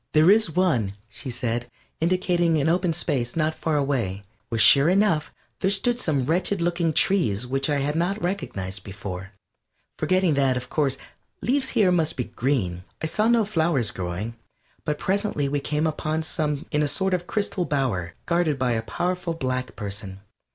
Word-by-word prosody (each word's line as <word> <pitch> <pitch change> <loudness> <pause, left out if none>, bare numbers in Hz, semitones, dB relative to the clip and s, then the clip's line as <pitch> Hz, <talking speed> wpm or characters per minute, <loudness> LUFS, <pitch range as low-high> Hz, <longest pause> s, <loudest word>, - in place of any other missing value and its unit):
"There 155 +4 +6
is 215 -3 +4
one," 125 - +2 0.2
she 115 +5 -7
said, 120 0 -2 0.3
indicating 175 -1 +2
an 145 - +1
open 175 +1 +2
space 140 -7 -1
not 160 -1 +1
far 160 -1 -1
away, 120 -9 -1 0.3
where 115 - -1
sure 140 +6 +6
enough 185 -5 +2 0.3
there 190 - +2
stood 235 +5 +1
some 140 - 0
wretched 180 +6 +1
looking 170 -1 +1
trees 125 - +2
which 135 +3 -1
I 145 - +2
had 145 +2 -1
not 180 +5 0
recognized 105 - -3
before, 95 -1 -7 0.7
forgetting 185 -3 +2
that, 135 -2 +2
of 125 0 -6
course, 140 -4 +1 0.5
leaves 265 +1 +2
here 200 -5 +5
must 165 -2 +1
be 125 - -1
green. 110 -10 -1 0.2
I - - -3
saw 210 +7 +1
no 235 -2 +4
flowers 160 - +1
growing, 95 +5 -4 0.5
but 150 -1 -1
presently 195 -7 0
we 145 +1 0
came 150 +2 -1
upon 155 0 -1
some 150 -1 -2
in 150 -2 +2
a 150 - +2
sort 190 +7 +1
of 180 -1 -1
crystal 200 -4 -1
bower 115 - -1
guarded 170 -4 +1
by 130 -2 +1
a 115 -1 0
powerful 175 +8 -2
black 130 -4 -3
person. 100 -2 -5
150 Hz, 170 wpm, -25 LUFS, 125-175 Hz, 0.7 s, There